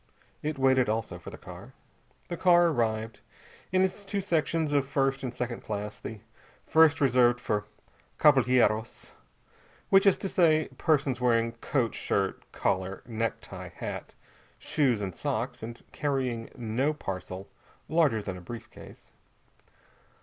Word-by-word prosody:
It 150 -1 -3
waited, 130 -3 +3
also, 110 0 -2
for - - -9
the - - -10
car. - - -11 0.5
The 175 - -3
car 175 -1 +5
arrived, 115 -5 -1 0.5
in 185 0 +4
its 190 +2 -1
two 200 0 -2
sections 165 -4 0
of 140 -2 +2
first 135 0 +1
and 130 - -3
second 125 -1 -4
class; 105 0 -5
the 110 -2 -7 0.4
first 160 -2 +5
reserved 120 -3 +4
for 105 -3 -1 0.5
cavalhieros, 125 -6 +3 0.8
which 195 +1 +6
is 195 - +5
to - - -3
say 160 -4 +3
persons 140 -6 +1
wearing 115 -2 +3
coat, 115 0 -1
shirt, 95 -1 -2
collar, 95 0 -1
necktie, 115 -2 -4
hat, - - -6 0.4
shoes 125 -8 +1
and 95 -2 -3
socks, - - -3
and 115 +1 -8
carrying 130 -5 -2
no 125 +5 -1
parcel 95 -4 -6 0.4
larger 150 -10 +2
than 95 -2 -5
a - - -10
brief 115 +6 -9
case. - - -14
125 Hz, 135 wpm, -28 LUFS, 110-150 Hz, 0.8 s, which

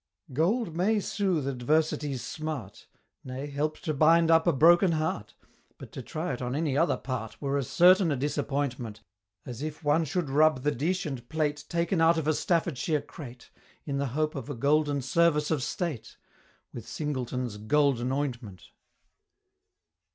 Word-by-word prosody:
Gold 175 - 0
may 205 +5 +2
soothe 185 -8 -1
Adversity's 145 +1 0
smart; 155 -5 -6 0.4
Nay, 130 +2 -6
help 145 +2 -2
to 155 - -2
bind 165 +3 +4
up 165 0 +4
a - - +6
broken 170 +5 +5
heart; 155 -9 -2 0.4
But - - -11
to - - -7
try 155 -2 -4
it 125 - -6
on 125 +1 -2
any 150 -3 0
other 165 +4 +2
part 120 -5 -5
Were 140 -1 -2
as 140 -4 -2
certain 180 -1 +5
a - - +1
disappointment, 135 -5 -2 0.4
As 125 0 -7
if 155 +1 -5
one 150 +2 +2
should 165 +2 -2
rub 145 -1 +3
the 150 - +2
dish 180 +8 -1
and 130 -5 -6
plate, 150 -2 -1
Taken 170 0 0
out 165 +1 +5
of 155 -2 -2
a 155 - +3
Staffordshire 160 -3 0
crate 140 -4 -11 0.3
In 140 -2 -2
the 140 - 0
hope 155 0 +1
of 135 -1 -6
a 145 - -4
Golden 145 +2 +1
Service 150 +2 +2
of 155 -4 +1
State 135 - -4 0.6
With - - -8
Singleton's 125 -6 -3
"Golden 130 +2 +1
Ointment." 120 - -4
150 Hz, 160 wpm, -28 LUFS, 130-160 Hz, 0.6 s, a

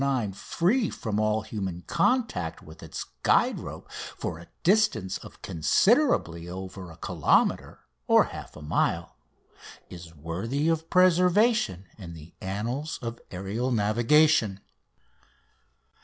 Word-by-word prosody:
9" 130 -8 0
free 200 - 0
from 105 -2 -3
all 110 0 +1
human 95 -5 -5
contact 225 - 0
with 80 +1 -13
its - - -6 0.2
guide - - +3
rope - - -8
for 80 - -6
a 85 - -13 0.2
distance 170 - +2
of - - -14
considerably 85 - +2
over 95 0 -7
a 80 - -13
kilometre - - +1 0.3
(half - - +2
mile), 75 -1 -1 0.8
is 85 -2 -10
worthy 95 - -2
of 165 0 0
preservation 180 - +3
in 85 -4 -8
the 80 +1 -13
annals 115 +11 -3
of 115 0 -5
aerial 100 +8 -3
navigation. 120 +1 +3
110 Hz, 110 wpm, -27 LUFS, -, 0.8 s, guide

